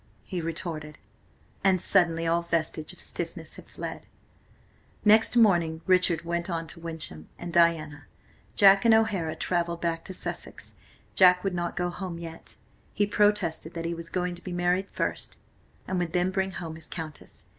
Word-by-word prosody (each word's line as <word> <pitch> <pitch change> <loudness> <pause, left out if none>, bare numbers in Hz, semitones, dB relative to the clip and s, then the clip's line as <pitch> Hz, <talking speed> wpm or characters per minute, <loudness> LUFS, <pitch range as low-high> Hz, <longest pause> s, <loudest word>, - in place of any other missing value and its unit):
he 175 +10 -4
retorted, 160 -2 -5 0.7
and 190 -2 +4
suddenly 165 -1 +2
all 165 +1 +2
vestige 165 -2 -2
of - - -17
stiffness - - -6
had - - -14
fled. - - -7 1.0
Next 220 +3 +5
morning 170 -8 +4
Richard 180 -3 +3
went 170 +1 -2
on 165 -1 -2
to 170 - -9
Wyncham, 160 - -6
and 175 -1 -7
Diana, 165 -3 +2 0.5
Jack 195 -1 +7
and 230 -1 +6
O'Hara 195 -8 +1
travelled 170 -1 -1
back 165 -1 -1
to 190 - -7
Sussex. - - -7 0.4
Jack 180 -1 +6
would 195 -2 -1
not 175 -1 -3
go 175 0 0
home 180 -2 -5
yet. 165 -1 -8 0.4
He 205 - +3
protested 205 -6 +1
that 165 0 -4
he 170 - -1
was 165 0 -7
going 180 0 -1
to 175 - -11
be 185 - -6
married 180 +2 +1
first, - - -3 0.5
and 185 -1 -1
would 170 -2 -2
then 180 +1 +2
bring 190 0 0
home 165 -3 -5
his 160 - -9
Countess. 160 -3 -8
170 Hz, 165 wpm, -27 LUFS, 165-185 Hz, 1.0 s, Jack